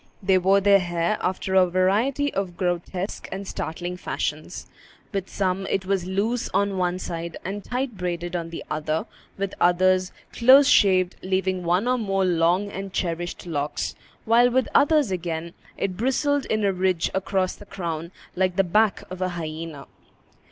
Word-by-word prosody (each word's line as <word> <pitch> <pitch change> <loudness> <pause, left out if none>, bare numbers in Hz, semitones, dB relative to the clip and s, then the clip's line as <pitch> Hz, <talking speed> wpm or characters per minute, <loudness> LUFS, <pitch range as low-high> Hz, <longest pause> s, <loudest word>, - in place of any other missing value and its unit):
They 190 -1 +4
wore 195 +2 +4
their 200 0 +6
hair 175 +2 -1
after 190 +1 -2
a 185 -1 +5
variety 215 +11 +1
of 185 -3 -3
grotesque 180 +2 -3
and 195 0 -5
startling 175 +3 -4
fashions. 155 -1 -4 0.5
With 195 -1 -3
some, 190 0 -1
it 190 - -1
was 190 -2 -1
loose 215 +6 -1
on 200 -1 +1
one 180 0 0
side, 170 -2 -5
and 200 +2 -4
tight 250 -3 -3
braided 175 -1 -3
on 165 -1 -3
the 165 - -7
other; 155 +4 -2 0.3
with 195 -1 -3
others, 185 +1 +3 0.2
close 265 +4 +7
shaved, 185 -8 +4
leaving 185 0 0
one 180 +6 +1
or 250 0 +2
more 195 -3 0
long 180 +3 +2
and 195 0 -6
cherished 175 -1 -3
locks; 150 -4 -2 0.3
while, 235 +2 +5
with 255 +1 +1
others 290 -6 +4
again, 170 -2 -3 0.2
it 185 -2 -2
bristled 275 +4 +1
in 215 -1 0
a 195 - +2
ridge 185 -2 0
across 190 -1 0
the 205 - -14
crown, 170 -3 -4 0.2
like 185 -1 +1
the 195 - +4
back 210 +4 +2
of 185 0 -7
a 185 - +1
hyena. 160 -3 -6
185 Hz, 165 wpm, -24 LUFS, 175-200 Hz, 0.5 s, close